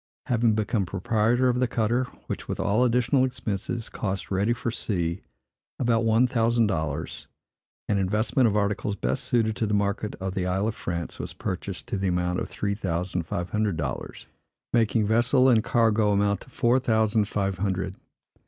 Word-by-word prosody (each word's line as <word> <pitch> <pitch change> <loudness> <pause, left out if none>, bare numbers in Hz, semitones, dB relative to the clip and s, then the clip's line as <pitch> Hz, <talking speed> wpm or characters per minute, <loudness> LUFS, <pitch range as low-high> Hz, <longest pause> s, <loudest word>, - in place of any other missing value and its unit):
Having 115 -2 +2
become 110 0 0
proprietor 115 +6 +1
of 125 0 +1
the 125 - +2
cutter, 120 +2 +1 0.2
which, - - -5
with - - -4
all 110 +5 +2
additional 125 +2 +3
expenses, 115 -2 -3
cost, 95 -1 -4
ready 100 +4 +1
for 120 0 -2
sea, 85 -5 -2 0.6
about 115 -2 +2
one 115 +2 +4
thousand 115 -2 +2
dollars, 80 -6 -3 0.6
an 100 - +1
investment 110 +6 +2
of 105 -1 +1
articles 105 0 0
best 65 -7 -2
suited 110 -3 +1
to 110 - 0
the 105 - +1
market 100 +1 -1
of 95 0 -4
the 95 -2 -1
Isle 95 +3 0
of 110 - -1
France, 85 -5 -5
was - - -5
purchased 95 +1 -5
to 110 - -1
the 95 0 -1
amount 90 0 0
of - - -4
three 100 -1 -2
thousand 90 -3 -2
five 90 +1 -3
hundred 105 -5 0
dollars; 75 -4 -5 0.5
making 115 -2 +3
vessel 120 +4 +4
and 115 -4 +4
cargo 110 -3 +3
amount 100 0 +1
to - - -14
four 125 0 +2
thousand 110 -3 +2
five 100 -3 -2
hundred. 95 -1 -1
105 Hz, 175 wpm, -26 LUFS, 95-115 Hz, 0.6 s, one